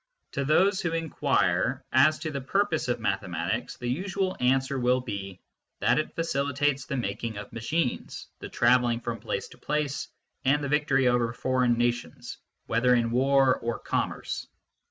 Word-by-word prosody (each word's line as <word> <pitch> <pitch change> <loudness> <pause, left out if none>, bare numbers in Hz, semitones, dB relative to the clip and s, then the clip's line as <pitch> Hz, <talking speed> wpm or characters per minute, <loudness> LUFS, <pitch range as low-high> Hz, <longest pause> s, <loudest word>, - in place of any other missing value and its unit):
To 140 - -2
those 185 +7 +3
who 170 -2 -1
inquire 135 - 0
as 155 +4 +5
to 155 - -3
the 140 -1 -4
purpose 175 +3 0
of 120 - 0
mathematics, 95 +3 -2
the 120 - -5
usual 185 +7 -1
answer 130 +2 +1
will 125 +1 +3
be 100 -6 -6 0.4
that - - +3
it 155 - -4
facilitates 140 -3 0
the 140 - -2
making 110 0 -3
of 105 0 -8
machines, 125 +4 -2
the - - -7
travelling 120 -1 +3
from 120 -1 -4
place - - -3
to - - -16
place, 150 -2 -2 0.4
and 145 +2 +2
the 140 - -2
victory 135 -3 +2
over 120 -1 +2
foreign 125 -1 +1
nations, 120 0 -2 0.3
whether 125 +2 +3
in 115 -1 +1
war 135 +1 +4
or 120 0 -2
commerce. - - -3
130 Hz, 155 wpm, -27 LUFS, 120-145 Hz, 0.4 s, as